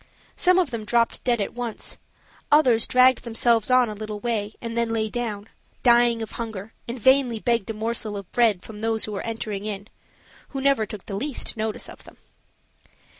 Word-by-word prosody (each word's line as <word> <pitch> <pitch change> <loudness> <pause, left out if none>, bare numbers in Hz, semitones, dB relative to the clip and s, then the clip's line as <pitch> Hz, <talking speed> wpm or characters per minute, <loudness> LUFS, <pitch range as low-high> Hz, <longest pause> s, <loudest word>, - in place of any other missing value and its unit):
Some 365 0 +4
of 355 -8 +2
them 230 -2 -4
dropped 230 +2 +1
dead 240 -2 +1
at 200 - -2
once; 240 -2 -4 0.5
others 255 -7 +5
dragged 255 0 +5
themselves 230 -1 +2
on 255 -1 +5
a 215 - -4
little 210 0 -6
way 215 -2 -2
and 230 -1 -5
then 235 -1 +1
lay 220 -1 0
down, 215 -3 -4 0.4
dying 235 -2 +4
of 220 - -7
hunger, 220 -2 -6
and 235 +2 -4
vainly 260 -1 +4
begged 230 -2 0
a - - -1
morsel 220 -1 -2
of 200 -2 -9
bread 220 -6 +3
from 220 - -10
others 225 0 0
who 215 - -6
were 200 - -3
entering 220 -3 -4
in 205 0 -5 0.6
who 275 - -4
never 270 -5 +2
took 205 -2 -9
the - - -7
least 260 +7 -2
notice 220 -1 -3
of - - -12
them. - - -15
230 Hz, 190 wpm, -24 LUFS, 215-240 Hz, 0.6 s, others